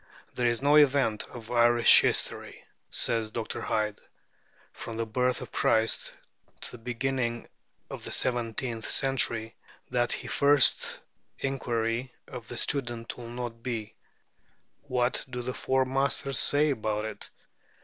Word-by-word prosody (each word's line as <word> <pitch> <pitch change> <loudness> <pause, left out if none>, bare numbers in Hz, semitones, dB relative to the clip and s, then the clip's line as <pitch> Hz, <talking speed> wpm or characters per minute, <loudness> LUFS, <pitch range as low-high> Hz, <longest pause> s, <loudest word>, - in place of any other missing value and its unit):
"There 125 -1 +1
is 120 +2 -1
no 145 +1 +5
event 135 -7 +3
of 115 -3 -10
Irish 120 0 +6
history," - - -2 0.2
says 115 -2 0
Dr. 110 0 -5
Hyde, 105 -1 -1 0.7
"from 115 -1 -7
the 115 - -1
birth 125 +3 0
of - - -8
Christ 110 0 +1 0.4
to - - -6
the 125 - -9
beginning 120 0 -2 0.4
of - - -8
the - - -7
seventeenth 120 -1 -1
century, 115 -4 +1 0.4
that 120 -1 +1
the - - -9
first 140 -1 +3 0.4
inquiry 120 -2 -2 0.2
of 120 -3 -9
the 120 - -7
student 120 -4 -2
will 120 -1 -9
not 120 -1 -6
be 115 -4 -4 0.9
What 125 -1 0
do 125 -1 -5
the 125 +1 -3
Four 130 +1 +1
Masters 135 0 +1
say 145 +1 +3
about 110 -4 -2
it?" 110 -1 -7
120 Hz, 135 wpm, -28 LUFS, 115-130 Hz, 0.9 s, Irish